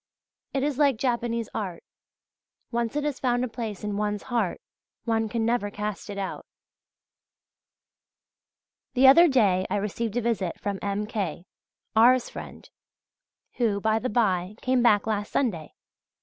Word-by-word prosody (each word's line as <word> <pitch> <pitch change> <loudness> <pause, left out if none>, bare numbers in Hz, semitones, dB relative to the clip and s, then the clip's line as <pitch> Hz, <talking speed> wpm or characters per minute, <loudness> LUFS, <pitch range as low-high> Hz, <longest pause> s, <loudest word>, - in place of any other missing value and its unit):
It 270 -2 -1
is 290 -1 -1
like 280 -5 +4
Japanese 235 -2 -1
art, 190 -6 -4 0.9
once 235 +1 -1
it 295 - 0
has 290 -2 -2
found 245 -1 +1
a - - -3
place 225 -4 -6
in 205 -1 -2
one's 210 -1 -1
heart 220 -7 0 0.5
one 225 -2 0
can 225 0 -1
never 230 -3 +1
cast 210 0 -5
it 200 - -5
out.{Y} 195 -1 -4 2.5
The 260 +1 +5
other 335 +6 +8
day 200 - +3
I - - 0
received 210 +2 -2
a - - +1
visit 215 -7 -1
from 200 -1 -3
M. 200 +1 -2
K., 190 -6 -4 0.5
R.'s 245 +3 +5
friend, - - -9 0.9
who, 220 -5 +1
by 220 +1 +1
the 255 - -2
by, 195 -4 +1
came 255 -1 +2
back 210 -4 +4
last 210 -2 -2
Sunday. 180 - -1
220 Hz, 150 wpm, -26 LUFS, 205-245 Hz, 2.5 s, other